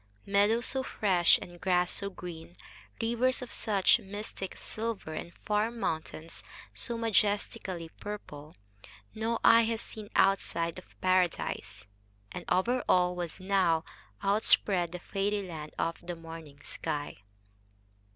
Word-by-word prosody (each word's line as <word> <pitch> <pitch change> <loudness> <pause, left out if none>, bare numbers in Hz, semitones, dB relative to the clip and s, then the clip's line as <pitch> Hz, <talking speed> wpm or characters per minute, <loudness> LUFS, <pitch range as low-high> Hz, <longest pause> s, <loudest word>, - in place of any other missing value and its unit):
Meadows 205 +4 +3
so 265 - 0
fresh 190 -9 +4
and 175 -1 -12
grass 180 -1 +2
so 200 - -2
green, 175 -2 -9 0.4
rivers 235 +3 +1
of 250 - -8
such 200 -4 +3
mystic 195 -1 -6
silver 220 -7 -4
and 170 - -5
far 210 +1 +2
mountains 165 -7 -4 0.3
so 235 -2 -3
majestically 205 -5 0
purple, 155 -7 -7 0.6
no 225 +1 0
eye 230 - +8
has 225 0 -1
seen 215 -2 -8
outside 170 -3 +2
of 185 - -20
Paradise; 185 - +1 0.5
and 180 - -6
over 240 +8 +2
all 180 0 +4
was 175 0 -4
now 185 -4 +2 0.4
outspread 195 -3 +3
the 180 - -4
fairy 200 +3 -1
land 155 -3 -7
of 165 - -1
the 175 0 -5
morning 165 -3 -10
sky. 145 -1 -4
190 Hz, 125 wpm, -31 LUFS, 170-215 Hz, 0.6 s, eye